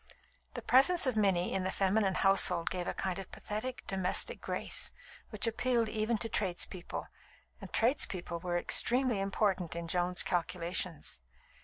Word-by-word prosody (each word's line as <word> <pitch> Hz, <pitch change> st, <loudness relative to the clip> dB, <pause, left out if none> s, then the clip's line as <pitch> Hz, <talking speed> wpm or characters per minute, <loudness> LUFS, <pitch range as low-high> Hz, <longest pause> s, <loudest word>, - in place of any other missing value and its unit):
The -, -, -5 dB
presence 275 Hz, +8 st, +5 dB
of 255 Hz, -3 st, +1 dB
Minnie 195 Hz, -4 st, +2 dB
in 190 Hz, -, 0 dB
the 185 Hz, -, -1 dB
feminine 195 Hz, 0 st, +1 dB
household 185 Hz, -3 st, +4 dB
gave 180 Hz, -1 st, -3 dB
a -, -, -1 dB
kind 190 Hz, 0 st, -2 dB
of 195 Hz, -, -8 dB
pathetic, 225 Hz, +5 st, -5 dB
domestic 190 Hz, -1 st, -1 dB
grace, -, -, -4 dB, 0.4 s
which -, -, -2 dB
appealed 235 Hz, 0 st, +1 dB
even 220 Hz, +1 st, 0 dB
to 225 Hz, -, -3 dB
tradespeople; 185 Hz, -3 st, -3 dB, 0.6 s
and -, -, -9 dB
tradespeople 190 Hz, -, 0 dB
were 175 Hz, 0 st, -1 dB
extremely 245 Hz, +4 st, +2 dB
important 195 Hz, -3 st, 0 dB
in 170 Hz, 0 st, -4 dB
Joan's 180 Hz, +1 st, +2 dB
calculations. 170 Hz, -, -2 dB
195 Hz, 145 wpm, -32 LUFS, 180-225 Hz, 0.6 s, presence